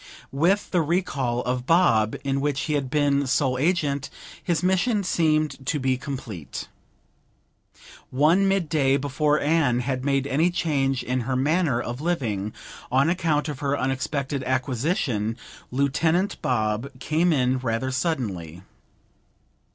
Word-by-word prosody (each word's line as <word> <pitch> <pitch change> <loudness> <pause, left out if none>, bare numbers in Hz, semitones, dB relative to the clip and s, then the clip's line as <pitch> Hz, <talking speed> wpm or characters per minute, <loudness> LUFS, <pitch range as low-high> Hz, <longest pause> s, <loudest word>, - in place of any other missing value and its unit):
With 175 +9 +1
the 180 - +3
recall 145 -8 -1
of 125 0 -2
Bob, 115 -11 +3
in 140 0 -1
which 145 -1 0
he 155 - -2
had 140 -3 -1
been 140 -1 +2
sole 130 -1 +1
agent, 145 -3 0 0.3
his 170 -1 0
mission 195 +4 +2
seemed 155 -5 +1
to 150 - 0
be 130 -1 +1
complete. 125 - -6 1.4
One 160 +9 +3
mid 195 -3 +1
day, 140 -3 +2
before 145 +2 +1
Anne 145 -5 +2
had 130 0 -2
made 135 -1 +1
any 150 +5 +2
change 140 -7 0
in 125 +1 -1
her 130 +2 -2
manner 145 -1 +1
of 120 +2 -5
living 115 - -1 0.4
on 135 +6 +3
account 160 -5 0
of 145 -3 -5
her 140 -1 0
unexpected 135 +1 -2
acquisition, 130 - -1 0.3
Lieutenant 160 +8 0
Bob 110 +1 0
came 160 +6 +1
in 130 -3 +2
rather 125 +1 -2
suddenly. 105 - -3
140 Hz, 135 wpm, -24 LUFS, 130-160 Hz, 1.4 s, the